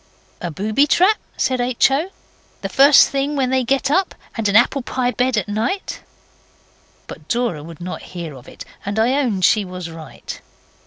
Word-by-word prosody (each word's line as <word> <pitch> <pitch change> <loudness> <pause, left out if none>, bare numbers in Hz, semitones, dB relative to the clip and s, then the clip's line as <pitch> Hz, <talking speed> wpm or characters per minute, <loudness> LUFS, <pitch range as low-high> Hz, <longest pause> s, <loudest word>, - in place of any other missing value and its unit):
'A 175 - -3
booby 215 - +1
trap,' 375 +7 +3 0.2
said 255 -1 0
H. 245 +1 +2
O., 305 +7 0 0.5
'the - - -4
first 280 +1 +6
thing 275 +2 -1
when 260 -2 0
they 260 -1 +2
get 275 +3 0
up, 375 +4 +1 0.2
and 225 -3 0
an 200 - 0
apple 245 +4 +4
pie 250 0 -1
bed 250 -1 0
at 210 - -1
night.' 225 - -2 1.1
But - - -11
Dora 235 -10 -1
would 165 +1 -11
not 180 +1 -6
hear 170 -4 -7
of 130 -3 -13
it, - - -11 0.2
and 200 +2 -4
I 230 +4 +3
own 220 -8 -1
she 205 +4 +4
was 180 -2 -7
right. 160 -3 -9
240 Hz, 180 wpm, -20 LUFS, 185-270 Hz, 1.1 s, first